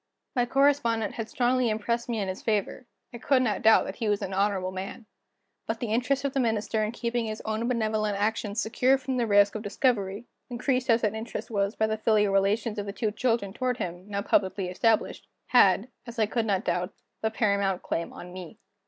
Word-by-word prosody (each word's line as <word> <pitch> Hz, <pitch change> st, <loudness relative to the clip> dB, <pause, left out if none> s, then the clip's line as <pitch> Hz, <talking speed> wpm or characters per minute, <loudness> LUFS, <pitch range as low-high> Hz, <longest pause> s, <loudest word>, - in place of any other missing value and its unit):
My 245 Hz, -1 st, +2 dB
correspondent 265 Hz, -5 st, +2 dB
had 225 Hz, -1 st, -5 dB
strongly 250 Hz, -1 st, +1 dB
impressed 235 Hz, +3 st, -2 dB
me 230 Hz, -2 st, -1 dB
in 195 Hz, -, -2 dB
his 185 Hz, +1 st, -5 dB
favor; 220 Hz, +3 st, -1 dB, 0.3 s
I 235 Hz, -, -7 dB
could 260 Hz, +1 st, +2 dB
not 215 Hz, -5 st, 0 dB
doubt 220 Hz, 0 st, +6 dB
that -, -, -6 dB
he 225 Hz, -3 st, -1 dB
was 205 Hz, -1 st, 0 dB
an 190 Hz, -, -4 dB
honorable 190 Hz, -1 st, 0 dB
man. 190 Hz, +5 st, -7 dB, 0.6 s
But 225 Hz, 0 st, -2 dB
the 225 Hz, -3 st, -2 dB
interest 270 Hz, +4 st, 0 dB
of 275 Hz, -, -1 dB
the 275 Hz, -, 0 dB
Minister 220 Hz, -2 st, 0 dB
in 215 Hz, -, -1 dB
keeping 235 Hz, -1 st, -2 dB
his 215 Hz, 0 st, -4 dB
own 220 Hz, +2 st, -1 dB
benevolent 215 Hz, -4 st, 0 dB
action 210 Hz, 0 st, -1 dB
secure 250 Hz, +4 st, +2 dB
from 260 Hz, -1 st, -3 dB
the 235 Hz, -2 st, +1 dB
risk 205 Hz, -1 st, +5 dB
of 215 Hz, -, -4 dB
discovery 205 Hz, -1 st, 0 dB, 0.2 s
increased 255 Hz, +1 st, -1 dB
as 230 Hz, 0 st, +4 dB
that 215 Hz, -1 st, +1 dB
interest 220 Hz, +2 st, -6 dB
was 200 Hz, 0 st, 0 dB
by 220 Hz, -, +2 dB
the 220 Hz, 0 st, -2 dB
filial 210 Hz, -2 st, +2 dB
relations 210 Hz, +2 st, +1 dB
of 205 Hz, -, -4 dB
the 200 Hz, -, -4 dB
two 215 Hz, +1 st, -1 dB
children 225 Hz, -4 st, 0 dB
toward 250 Hz, +1 st, -1 dB
him, 175 Hz, -2 st, -5 dB
now 200 Hz, 0 st, -2 dB
publicly 190 Hz, -2 st, +1 dB
established 220 Hz, +4 st, 0 dB, 0.2 s
had, 200 Hz, -2 st, +5 dB, 0.2 s
as 235 Hz, +1 st, -9 dB
I 220 Hz, -, +3 dB
could 225 Hz, +1 st, -1 dB
not 195 Hz, 0 st, 0 dB
doubt, 180 Hz, +2 st, -1 dB, 0.3 s
the 220 Hz, -, +1 dB
paramount 200 Hz, -4 st, 0 dB
claim 170 Hz, -, -3 dB
on 180 Hz, 0 st, -10 dB
me. 180 Hz, -3 st, -9 dB
220 Hz, 210 wpm, -27 LUFS, 200-235 Hz, 0.6 s, doubt